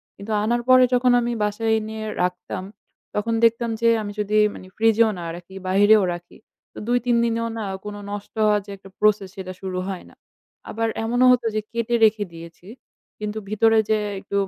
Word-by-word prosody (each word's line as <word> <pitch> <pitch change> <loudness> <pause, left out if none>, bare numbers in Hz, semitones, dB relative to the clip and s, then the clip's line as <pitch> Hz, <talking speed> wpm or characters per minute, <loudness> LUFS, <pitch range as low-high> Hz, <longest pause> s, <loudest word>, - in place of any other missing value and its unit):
কিন্তু 200 +2 -8
আনার 240 +2 +1
পরে 255 0 +8
যখন 250 0 +4
আমি 240 0 -1
বাসায় 215 +2 -1
এনে 220 0 -6 0.3
রাখতাম, 180 +1 -3 0.5
তখন 225 +2 -1
দেখতাম 230 +1 +3
যে, 230 - +4
আমি 205 -1 -5
যদি 210 +1 0 0.2
মানি 185 - -11
ফ্রিজেও 225 0 +4
না - - -6
রাখি, 175 +2 -12
বাহিরেও 205 +2 +5
রাখি, 175 0 -11 0.4
তো - - -16
২-৩ 245 0 +1
দিনেও 230 0 -1
না 220 - -3 0.2
কোন 210 0 -5 0.2
নষ্ট 205 0 -7
হওয়ার 210 -1 +3
যে 205 - -9
একটা 195 0 -15
প্রসেস, 210 -2 +2
সেটা 185 -2 -6
শুরু 190 -1 -4
হয় 190 -2 -5
না। - - -20 0.5
আবার 225 +1 -1 0.2
এমনও 245 +3 +2
হত 245 -1 +3
যে 215 - +1
কেটে 235 0 -1
রেখে 215 -1 +2
দিয়েছি। 165 +2 -12 0.5
কিন্তু 210 0 -4
ভিতরে 225 +1 +3
যে 220 - +3 0.2
একটু 200 0 -2
215 Hz, 180 wpm, -23 LUFS, 195-230 Hz, 0.5 s, পরে